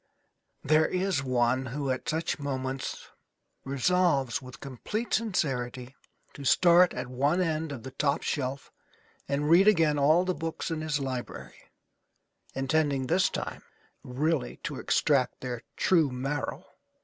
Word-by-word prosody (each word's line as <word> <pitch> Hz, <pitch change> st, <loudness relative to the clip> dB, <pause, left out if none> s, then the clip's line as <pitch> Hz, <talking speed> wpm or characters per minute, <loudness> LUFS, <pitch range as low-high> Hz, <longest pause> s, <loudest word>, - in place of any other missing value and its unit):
There 155 Hz, +3 st, +4 dB
is 185 Hz, -5 st, 0 dB
one 130 Hz, 0 st, +1 dB
who 135 Hz, +2 st, -2 dB
at 130 Hz, -, -3 dB
such 160 Hz, +1 st, -1 dB
moments 130 Hz, -2 st, -4 dB, 0.6 s
resolves, 140 Hz, -1 st, +1 dB
with 130 Hz, +1 st, -11 dB
complete 175 Hz, -, -5 dB
sincerity, 130 Hz, -, -1 dB, 0.4 s
to 140 Hz, -, -9 dB
start 175 Hz, +5 st, +5 dB
at 125 Hz, -, -3 dB
one 140 Hz, +7 st, 0 dB
end 160 Hz, -3 st, -1 dB
of 125 Hz, -5 st, -7 dB
the 130 Hz, -, -7 dB
top 140 Hz, +3 st, 0 dB
shelf 135 Hz, -1 st, -3 dB, 0.6 s
and 145 Hz, +1 st, -1 dB
read 175 Hz, +5 st, +6 dB
again 160 Hz, -8 st, +4 dB
all 155 Hz, +6 st, +4 dB
the 185 Hz, -, 0 dB
books 165 Hz, 0 st, -4 dB
in 160 Hz, -1 st, -2 dB
his 155 Hz, -2 st, -1 dB
library, 130 Hz, -3 st, -5 dB, 1.0 s
intending 135 Hz, 0 st, +1 dB
this 180 Hz, +7 st, +2 dB
time -, -, -5 dB, 0.4 s
really 140 Hz, 0 st, -1 dB
to -, -, -4 dB
extract 125 Hz, +9 st, +1 dB
their 125 Hz, -2 st, -4 dB, 0.2 s
true 165 Hz, -6 st, +3 dB
marrow. 135 Hz, +3 st, -4 dB
140 Hz, 135 wpm, -28 LUFS, 130-160 Hz, 1.0 s, read